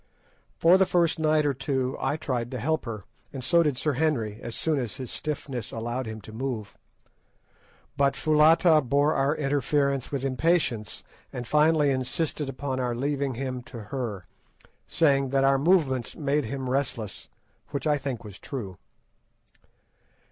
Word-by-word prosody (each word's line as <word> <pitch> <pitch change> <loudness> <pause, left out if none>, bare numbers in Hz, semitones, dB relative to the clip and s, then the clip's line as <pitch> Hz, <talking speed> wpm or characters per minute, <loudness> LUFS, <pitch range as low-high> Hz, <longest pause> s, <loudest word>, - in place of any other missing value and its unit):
For 175 +3 +6
the 190 - +4
first 170 -2 +2
night 155 -1 +3
or 145 - +2
two 135 -1 -1
I 150 - 0
tried 125 -6 -2
to 130 - -4
help 160 +6 0
her, 110 -4 -5 0.3
and 135 -2 -6
so 170 +7 +4
did 150 -6 +1
Sir 150 +2 0
Henry 125 -8 0
as 115 -1 -6
soon 155 -3 0
as 120 -2 -4
his 130 -3 -7
stiffness 135 -6 -4
allowed 120 +2 -3
him 110 0 -6
to 110 - -12
move, 115 -4 -4 1.2
but 140 -1 +3
Foulata 155 +1 +5
bore 145 +4 +2
our 135 +3 +1
interference 140 -2 0
with 140 -2 -2
impatience, 130 -5 0 0.3
and 125 - -5
finally 150 0 +4
insisted 135 +3 -2
upon 135 0 -3
our 125 -2 -1
leaving 140 0 -1
him 130 0 -3
to 120 -1 -10
her, 115 -9 -3 0.6
saying 140 -4 +2
that 135 0 +2
our 135 0 +4
movements 140 -7 +2
made 145 -2 0
him 130 +3 -4
restless, 125 -6 -2 0.4
which 140 - -4
I 150 -1 +2
think 135 -5 -4
was 105 -3 -10
true. 105 - -6
135 Hz, 155 wpm, -27 LUFS, 125-150 Hz, 1.2 s, For